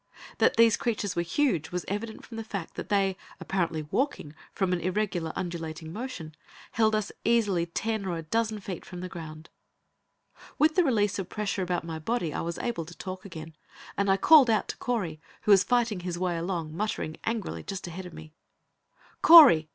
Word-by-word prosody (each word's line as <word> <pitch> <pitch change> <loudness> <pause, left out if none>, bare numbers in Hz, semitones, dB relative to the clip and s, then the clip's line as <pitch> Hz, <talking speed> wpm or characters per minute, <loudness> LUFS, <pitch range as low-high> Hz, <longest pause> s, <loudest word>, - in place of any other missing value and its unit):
That - - +3
these 230 -1 +6
creatures 215 -4 -2
were 170 - +1
huge, 175 - 0
was 180 0 -3
evident 220 +3 -5
from 230 - -10
the 225 - -4
fact 200 -6 -6
that - - -7
they, 195 -2 +2 0.2
apparently 170 -4 -1
walking, 155 - -2 0.2
from 190 -2 -1
the 175 -2 -1
irregular, 185 -3 -1
undulating 165 -2 -5
motion, 215 -9 -6 0.4
held 220 -1 +2
us 215 -1 -2
easily 210 -7 +2
ten 215 +3 -2
or 175 -2 -2
a 165 - -6
dozen 220 +5 -1
feet 185 -3 -6
from 180 -1 -9
the 185 - -4
ground. 160 -2 -9 1.1
With 310 +1 +4
the 360 - +4
release 210 - +1
of 185 -2 -5
the - - -13
pressure 210 -2 -1
about 180 -2 -1
my 165 -1 -5
body 170 -2 -2
I - - -2
was 170 0 -4
able 235 -9 -3
to 175 +2 -12
talk 185 0 -7
again, 160 -4 -9 0.4
and 200 0 0
I 195 - +4
called 290 +2 +7
out 220 -2 +1
to - - -4
Correy, 195 -11 -2 0.2
who 210 - +3
was 195 -2 +7
fighting 235 -5 +1
his 175 -1 -4
way 180 -1 -1
along, 165 -2 -3
muttering, 175 -5 -3
angrily, 225 -3 -3
just 195 -1 -6
ahead 180 +2 -7
of 175 - -12
me. 155 -1 -11 0.9
"Correy! 275 - +9
190 Hz, 195 wpm, -28 LUFS, 170-220 Hz, 1.1 s, Correy